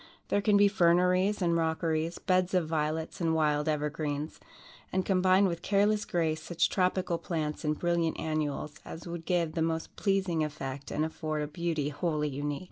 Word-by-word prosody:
There 205 - +2
can 205 0 +4
be 205 0 +6
ferneries 180 +1 +3
and 170 -1 +2
rockeries, 160 0 0
beds 185 0 +1
of 175 -3 +2
violets 155 +1 -2
and 165 -1 +2
wild 150 -1 +1
evergreens, 150 0 -2 0.5
and 185 0 0
combined 185 +1 +4
with 170 -2 -3
careless 205 +1 +2
grace, 160 -2 0
such 170 +1 0
tropical 180 -2 0
plants 155 -3 -3
and 150 -1 0
brilliant 170 -2 0
annuals 155 -1 -2
as 165 - -9
would 170 -1 -6
give 170 -3 0
the 165 - -1
most 160 0 -2
pleasing 190 -5 +1
effect 140 -2 -5
and 155 - 0
afford 155 -1 -3
a - - -3
beauty 155 -2 -2
wholly 150 -1 -1
unique. 145 +1 -3
165 Hz, 170 wpm, -30 LUFS, 155-180 Hz, 0.5 s, be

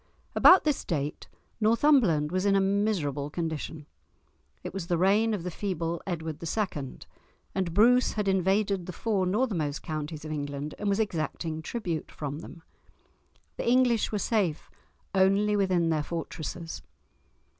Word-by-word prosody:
About 370 - +7
this 300 -3 0
date 150 -4 -3 0.3
Northumberland 220 - +3
was 185 +1 0
in 200 -1 +3
a - - +5
miserable 195 -8 0
condition; 160 -1 -4 0.8
it - - -6
was 190 -3 -5
the 175 - +1
reign 205 +6 +3
of 205 -6 -2
the 180 - -4
feeble 170 -3 -3
Edward 160 -4 -4
II., 165 -7 -3 0.6
and 185 -3 -1
Bruce 245 +5 +5
had 210 -2 -2
invaded 190 0 +1
the 180 - -5
four 200 -4 0
northernmost 180 - -1
counties 155 -1 -5
of 155 - -5
England, 145 0 -4
and 205 - -1
was 200 +1 +1
exacting 160 -5 -2
tribute 175 -5 -4
from 145 0 -5
them. 165 0 -11 0.9
The - - -1
English 245 -3 +3
were 210 - 0
safe 200 -7 -1 0.4
only 195 +2 +3
within 185 -4 +2
their 155 -1 +1
fortresses. 165 +1 -5
180 Hz, 145 wpm, -28 LUFS, 155-210 Hz, 0.9 s, About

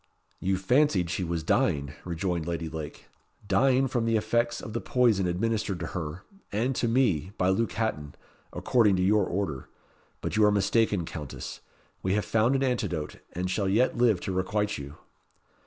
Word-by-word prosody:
"You 95 0 0
fancied 95 - +2
she 95 - -1
was 85 -2 -2
dying," 70 -2 +1
rejoined 85 -1 -2
Lady 85 -1 -2
Lake 80 -2 -7 0.4
"dying 135 +2 +3
from 120 -3 -1
the 115 -1 +2
effects 115 +2 0
of 105 - -8
the 115 - -2
poison 115 -7 +2
administered 105 +1 -1
to 80 - -4
her 85 -1 -5 0.3
and 120 +6 0
to 120 - +1
me 100 - +1
by 90 - +2
Luke 110 +5 +1
Hatton, 75 -11 -2 0.4
according 110 -6 +3
to 90 - +1
your 100 0 +3
order; 85 -8 -3 0.5
but - - -3
you 110 - +4
are 105 - +6
mistaken, 105 -2 +2
Countess. 75 -4 -7 0.4
We 95 +1 0
have 105 - 0
found 115 +4 +2
an 135 - +1
antidote, 105 - -2 0.2
and 90 +1 -2
shall 95 +1 0
yet 115 +6 +2
live 120 -6 +3
to - - -3
requite 105 +2 -1
you." 70 +2 -8
100 Hz, 170 wpm, -28 LUFS, 85-115 Hz, 0.5 s, are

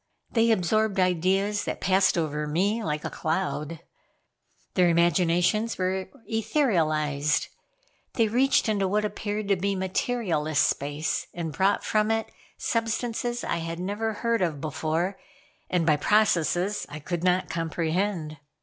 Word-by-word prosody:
They 230 -1 +3
absorbed 215 0 +2
ideas 190 +3 +1
that - - -3
passed 190 0 +3
over 150 -2 -1
me 200 +9 0
like 150 -3 -2
a - - -1
cloud. 160 -1 -2 0.9
Their 180 -2 +4
imaginations 175 +6 +2
were 185 0 -1 0.2
etherealized. 155 - +1 0.6
They 230 -2 +2
reached 255 +4 +3
into 200 -3 +1
what 210 +2 +1
appeared 210 0 -3
to 200 - +4
be 195 +2 -1
materialless 185 -5 -1
space, 145 +2 0
and 165 -3 -4
brought 195 +4 +2
from 215 0 +1
it 225 0 -1 0.3
substances 230 +1 -1
I - - -1
had 165 0 -4
never 205 +4 -2
heard 230 +1 0
of 165 -5 0
before, 160 +5 -2 0.5
and 175 -2 +1
by 155 -2 +4
processes 200 +1 +2
I 145 - -7
could 170 +3 -4
not 180 0 +1
comprehend. 165 0 -2
185 Hz, 130 wpm, -26 LUFS, 165-215 Hz, 0.9 s, Their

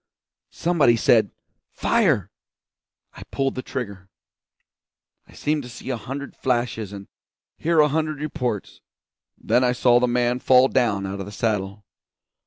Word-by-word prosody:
Somebody 155 -9 +3
said 110 -2 +3 0.4
'Fire!' 155 - +1 0.8
I - - -12
pulled 135 -1 -2
the 130 - -4
trigger. 100 -8 -6 1.2
I - - -18
seemed 150 0 -1
to 125 - -10
see 130 +2 -7
a - - -1
hundred 135 +4 -7
flashes 120 -5 -1
and 100 -1 -9 0.5
hear 165 0 +1
a 150 - +6
hundred 155 0 -1
reports, 125 -8 -4 0.6
then 125 - +1
I 125 -1 +2
saw 120 -1 +4
the 125 - +2
man 120 0 +1
fall 130 +1 +5
down 110 -6 +1
out 95 +1 -5
of 95 - -6
the - - -8
saddle. 100 -2 -2
125 Hz, 145 wpm, -23 LUFS, 105-135 Hz, 1.2 s, a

